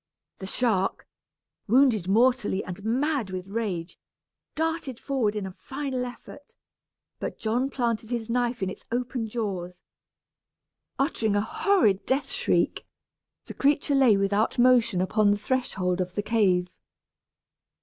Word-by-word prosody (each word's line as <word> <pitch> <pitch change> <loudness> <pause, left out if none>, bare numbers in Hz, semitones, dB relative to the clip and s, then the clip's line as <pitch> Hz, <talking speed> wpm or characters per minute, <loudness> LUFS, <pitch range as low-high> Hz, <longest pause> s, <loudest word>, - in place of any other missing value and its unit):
The 190 - -6
shark, 195 -4 0 0.6
wounded 235 -5 +4
mortally 225 -1 +2
and 185 +2 -8
mad 255 0 0
with 185 0 -6
rage, 195 -6 -3 0.6
darted 320 -5 -2
forward 245 -7 -1
in 210 -2 -3
a 190 - -6
final 265 +4 -4
effort, 250 +3 -11 0.6
but - - -4
John 240 +5 0
planted 230 -4 -2
his 235 -3 -3
knife 240 -2 -1
in 190 - 0
its - - -10
open 245 -1 -2
jaws. 185 -6 -4 1.1
Uttering 230 -7 0
a 205 - +3
horrid 220 - +2
death 270 +2 0
shriek, - - +1 0.6
the - - -8
creature 285 0 +1
lay 260 -7 +5
without 200 +4 +1
motion 240 -6 +4
upon 205 +3 +2
the 205 - +3
threshold 195 -6 -1
of 180 0 -4
the 205 - -1
cave. 190 -5 +2
225 Hz, 130 wpm, -26 LUFS, 195-255 Hz, 1.1 s, lay